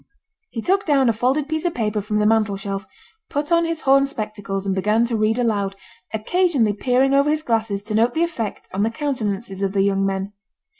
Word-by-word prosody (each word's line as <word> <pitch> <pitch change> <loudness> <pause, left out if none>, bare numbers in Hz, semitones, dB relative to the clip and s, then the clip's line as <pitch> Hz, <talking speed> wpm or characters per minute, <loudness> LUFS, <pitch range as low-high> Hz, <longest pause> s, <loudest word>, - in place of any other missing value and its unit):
He 225 - -5
took 390 +2 +2
down 275 -5 +3
a - - +3
folded 260 +6 0
piece 315 0 -2
of 350 -2 -1
paper 210 -2 -1
from 210 +1 -2
the 210 - +2
mantel 215 -2 +2
shelf, 195 0 -5 0.4
put 295 +3 -2
on 335 0 +4
his 330 -1 -3
horn 275 +1 +4
spectacles, 210 -6 -5
and 195 - 0
began 210 +4 +2
to 235 -1 -2
read 215 +1 +1
aloud, 205 -5 0 0.4
occasionally 245 - +1
peering 255 +5 +2
over 280 +1 +4
his 310 0 0
glasses 220 -5 -1
to 215 +1 -5
note 230 +3 +2
the 325 - +2
effect 240 -12 -4
on 195 - -1
the 220 - +2
countenances 225 -7 -3
of 195 -1 0
the 195 -1 +2
young 195 0 +1
men. 195 +1 -2
225 Hz, 210 wpm, -21 LUFS, 200-275 Hz, 0.4 s, on